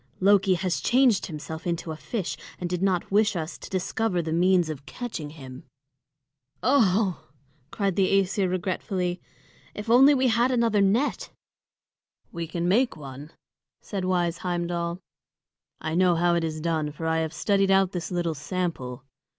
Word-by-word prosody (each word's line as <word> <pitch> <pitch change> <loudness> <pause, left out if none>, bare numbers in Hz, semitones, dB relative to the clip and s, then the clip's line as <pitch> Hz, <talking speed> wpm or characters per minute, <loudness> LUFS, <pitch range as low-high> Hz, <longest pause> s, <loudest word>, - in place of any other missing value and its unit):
Loki 195 -1 +4
has 180 0 -1
changed 245 -5 +3
himself 160 +1 -7
into 170 -1 -2
a - - -4
fish, 190 +4 -4 0.2
and 180 - -2
did 180 0 -3
not 190 -2 0
wish 210 +1 +3
us 160 0 -4
to - - -10
discover 190 +1 -1
the 160 -1 -2
means 180 0 +3
of 150 -2 -7
catching 175 -6 -6
him." 130 -4 -10 1.0
"Oho!" 210 - +3 0.5
cried 195 -1 -1
the 190 -1 +2
Æsir 195 -1 +2
regretfully. 180 0 -2 0.5
"If 210 +2 -3
only 270 +4 +7
we 260 -1 +2
had 235 +2 +3
another 230 -5 +2
net!" 215 +9 +1 1.0
"We 170 -1 -5
can 170 +1 -2
make 230 +2 +2
one," 140 0 -9 0.5
said 195 -3 -4
wise 175 -2 0
Heimdal. 175 -1 -2 0.8
"I 160 - -4
know 180 0 +4
how 175 +1 +2
it 170 -1 +1
is 155 -1 -3
done, 160 -2 -1
for 160 +2 -7
I 160 0 +1
have 160 -1 -2
studied 195 +4 +1
out 195 -1 +4
this 175 -2 -4
little 175 -2 -1
sample. 150 -6 -4
180 Hz, 160 wpm, -26 LUFS, 165-200 Hz, 1.0 s, only